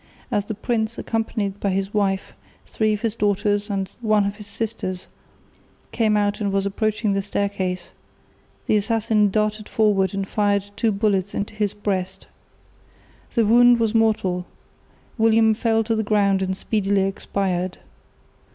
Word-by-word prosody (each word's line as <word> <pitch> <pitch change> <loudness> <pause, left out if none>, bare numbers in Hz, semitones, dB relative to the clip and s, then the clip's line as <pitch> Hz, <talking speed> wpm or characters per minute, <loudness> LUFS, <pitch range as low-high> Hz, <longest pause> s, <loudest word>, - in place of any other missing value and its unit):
As 205 - 0
the 215 - -4
prince, 220 +1 -1
accompanied 215 -3 -2
by 200 - 0
his 195 +1 -2
wife, 195 -2 0 0.3
three 215 -1 0
of 210 -1 -2
his 230 -3 0
daughters 205 0 0
and 195 -1 -2
one 215 -3 +3
of 200 +1 -3
his 210 -2 -9
sisters, 200 -4 -4 0.9
came 215 -2 +2
out 205 0 0
and 200 -1 0
was 195 0 0
approaching 215 +1 0
the 195 - 0
staircase, 190 -3 -2 0.7
the 215 - +3
assassin 215 -1 +2
darted 215 +1 -1
forward 200 -3 +2
and 195 -1 -2
fired 205 -1 0
two 225 -2 +1
bullets 200 -2 0
into 205 +1 -3
his 210 -1 -1
breast. 190 -2 -3 1.1
The 230 -2 +3
wound 240 +2 +6
was 225 -1 +1
mortal; 200 -5 +1 0.7
William 225 0 +4
fell 225 0 +1
to 225 +1 0
the 220 - +1
ground 200 -2 +2
and 190 0 -1
speedily 200 -2 +1
expired. 190 -2 -2
205 Hz, 150 wpm, -22 LUFS, 195-220 Hz, 1.1 s, wound